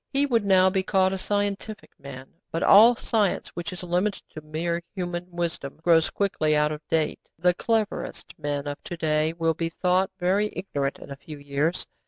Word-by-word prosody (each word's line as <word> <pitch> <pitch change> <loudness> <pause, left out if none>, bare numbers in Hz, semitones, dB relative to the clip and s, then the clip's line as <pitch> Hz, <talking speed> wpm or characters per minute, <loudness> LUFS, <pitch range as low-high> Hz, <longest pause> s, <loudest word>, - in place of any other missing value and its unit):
He 280 +1 +2
would 235 -6 +1
now 190 -2 +5
be 190 0 +1
called 190 0 +2
a - - -2
'scientific' 205 +2 -3
man. 135 -1 -10 0.2
But 165 - -1
all 225 +5 +8
science 215 -4 0
which 175 +3 -6
is 180 0 -8
limited 180 +4 -1
to 155 - -8
mere 165 +3 -2
human 175 -1 -4
wisdom 170 -5 -4
grows 165 -1 +4
quickly 155 -6 0
out 150 0 +2
of 150 0 -5
date. 160 -1 0 0.2
The 180 +2 +3
cleverest 220 +2 -2
men 145 -1 -2
of 145 0 -6
to 175 - -6
day 155 -1 +1
will 165 -1 +1
be 165 0 -2
thought 180 +2 +1
very 195 +4 +1
ignorant 140 -7 -2
in - - -12
a - - -5
few 150 +1 -10
years. 145 +4 -1
175 Hz, 190 wpm, -25 LUFS, 155-195 Hz, 0.2 s, all